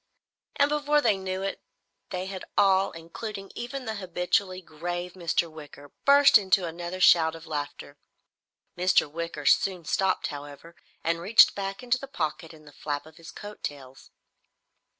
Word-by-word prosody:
And 285 - +4
before 295 0 +2
they 225 -8 +3
knew 190 0 -4
it 195 - -4 0.5
they 185 0 -4
had 190 -1 -6
all, 195 -1 +4
including 195 +5 -8
even 250 +2 -6
the 220 - -3
habitually 185 0 -1
grave 175 +1 -5
Mr. 170 -1 0
Wicker, 145 -2 -13
burst 280 -4 +7
into 190 -2 +2
another 175 +2 -6
shout 165 -3 +5
of 165 0 -11
laughter. 145 -1 -6 0.8
Mr. 180 -2 +3
Wicker 160 -1 -6
soon 180 0 +2
stopped, 190 +3 0
however, 145 +3 -10 0.3
and 165 +1 0
reached 210 +6 +6
back 195 +3 -5
into 250 +1 +1
the 275 - -8
pocket 165 - -4
in 155 -2 -16
the 145 - -14
flap 145 0 -4
of 160 +1 -16
his 165 -1 -12
coattails. 145 -10 -9
180 Hz, 150 wpm, -27 LUFS, 160-195 Hz, 0.8 s, burst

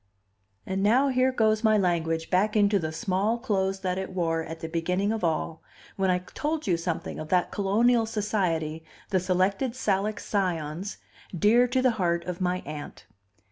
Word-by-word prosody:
And 190 +1 -2
now 250 +7 +4
here 255 0 +2
goes 220 -3 +2
my 215 -1 +4
language 165 -4 0
back 195 +4 +2
into 205 -1 +4
the 155 -2 -3
small 190 +7 0
clothes 195 -5 -1
that 185 -1 -1
it 190 0 -5
wore 165 -3 0
at 160 +1 -7
the 160 - -4
beginning 180 +5 0
of 220 -3 -3
all, 165 -1 -1 0.3
when 190 -1 +1
I 180 - +3 0.2
told 310 +1 -2
you 180 - +2
something 165 0 -4
of 155 - -7
that 180 -1 +2
colonial 225 +4 +2
society, 180 -8 -1 0.3
the 190 - +3
Selected 190 +7 0
Salic 205 -3 0
Scions, 180 -1 -2 0.4
dear 230 +7 +5
to 255 +1 0
the 255 - +5
heart 170 -1 +1
of 180 0 -5
my 180 0 0
Aunt. 150 0 -8
190 Hz, 175 wpm, -27 LUFS, 170-215 Hz, 0.4 s, dear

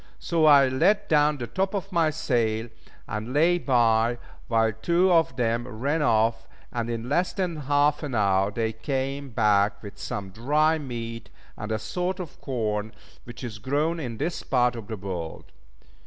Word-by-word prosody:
So 165 -2 +1
I 140 -2 +7
let 170 +11 +2
down 150 -1 +3
the 120 - -4
top 190 - -2
of 195 0 -4
my 165 -3 +3
sail, 115 -6 -1 0.4
and 110 +3 -4
lay 170 +4 +3
by, 120 -4 +2 0.3
while 115 -1 +2
two 170 - +2
of 165 -6 +3
them 120 -1 0
ran 140 +7 -1
off; 115 -3 +2 0.2
and 120 -1 -3
in 115 0 -4
less 175 +6 +1
than 180 -4 -2
half 145 +1 +2
an 145 -5 -4
hour 100 -2 +2
they 110 +1 -2
came 135 +3 -3
back 105 -3 +2
with 100 - -10
some 100 -2 -5
dry 150 +9 +2
meat 115 -4 -6 0.3
and 105 +1 -6
a 110 - +1
sort 180 - -3
of 175 -5 -8
corn 110 -4 -2 0.3
which 120 +1 -10
is 110 -4 -6
grown 150 +9 0
in 120 -7 -5
this 165 +6 -2
part 125 -2 +1
of 115 -3 -8
the 110 - -5
world. 90 -4 -6
125 Hz, 170 wpm, -26 LUFS, 110-150 Hz, 0.4 s, I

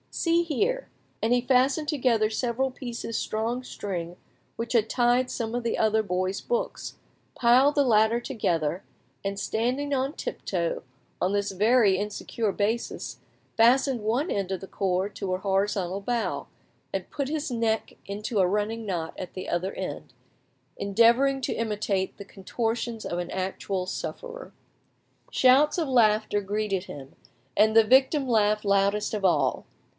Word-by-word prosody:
See 335 0 +2
here!" 420 - -1 0.3
and 220 - +1
he 245 0 +4
fastened 265 +4 +2
together 245 -7 +2
several 245 +3 -1
pieces 240 -3 -5
strong 230 +4 -2
string 180 -7 -5 0.4
which 230 +2 -4
had 225 -2 +3
tied 245 +1 +2
some 230 -1 -3
of 245 - -2
the 230 - -1
other 220 0 +2
boys' 185 0 -1
books, - - -3 0.4
piled 255 +4 +4
the 285 - +4
latter 220 -1 +3
together, 180 - -1 0.4
and 200 0 -3
standing 255 +8 -1
on 270 +1 0
tiptoe 170 - -3 0.4
on 185 - +2
this 200 0 0
very 210 0 +4
insecure 210 +1 -2
basis, 215 +4 -2 0.4
fastened 250 +2 +4
one 240 - 0
end 195 -2 -1
of 190 - -2
the 195 - -9
cord 190 +1 -1
to 185 -2 -2
a - - 0
horizontal 195 -1 -1
bough, 235 +2 -2 0.4
and - - -4
put 280 -2 -2
his 305 -1 -2
neck 225 -2 -1
into 205 +2 -3
a 185 - +4
running 210 +3 -1
knot 170 -4 -3
at 185 - -6
the 185 - -6
other 180 +3 -1
end, - - -6 0.6
endeavouring 235 +7 +3
to - - -1
imitate 205 -4 -2
the 200 - -9
contortions 225 +3 -3
of 175 - -2
an 175 0 -4
actual 190 0 -3
sufferer. - - -6 0.8
Shouts 270 +6 +4
of 330 -3 0
laughter 215 -4 +3
greeted 200 -1 -2
him, 140 -5 -10 0.4
and 220 +1 +4
the 225 - +8
victim 265 +4 +4
laughed 215 -2 +2
loudest 200 +2 +2
of 210 -2 -2
all. 145 -8 +2
220 Hz, 150 wpm, -26 LUFS, 195-250 Hz, 0.8 s, the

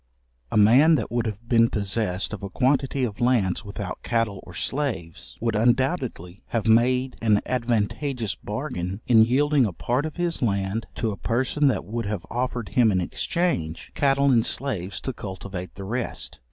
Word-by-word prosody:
A - - +1
man 130 +10 +6
that 115 -8 -2
would 120 -1 0
have 110 +2 -6
been 115 -1 +4
possessed 100 -1 -1
of 110 - -5
a 100 - -5
quantity 135 +3 +1
of 110 -3 -3
lands 115 -7 +2
without 100 -3 -6
cattle 115 -5 -1
or 85 - -11
slaves, 105 - -3
would 115 -1 0
undoubtedly 120 - 0
have 115 -3 -2
made 125 +3 +3
an 105 -3 +4
advantageous 120 0 -1
bargain, 105 - -4
in 115 -4 +6
yielding 140 +1 +3
a 95 - -5
part 125 - -1
of 155 - -9
his 175 -1 -2
land, 100 0 -1
to 115 -2 -1
a 100 - -6
person 130 +5 +1
that 110 -10 0
would 115 +2 -3
have 100 -4 -3
offered 120 -2 -2
him 120 -4 +4
in 95 - +2
exchange, 90 - -2
cattle 140 0 +3
and 115 -2 +3
slaves 105 -9 -2
to 130 - -3
cultivate 95 -3 -7
the 100 - -7
rest. 95 - -4
115 Hz, 170 wpm, -25 LUFS, 100-130 Hz, -, man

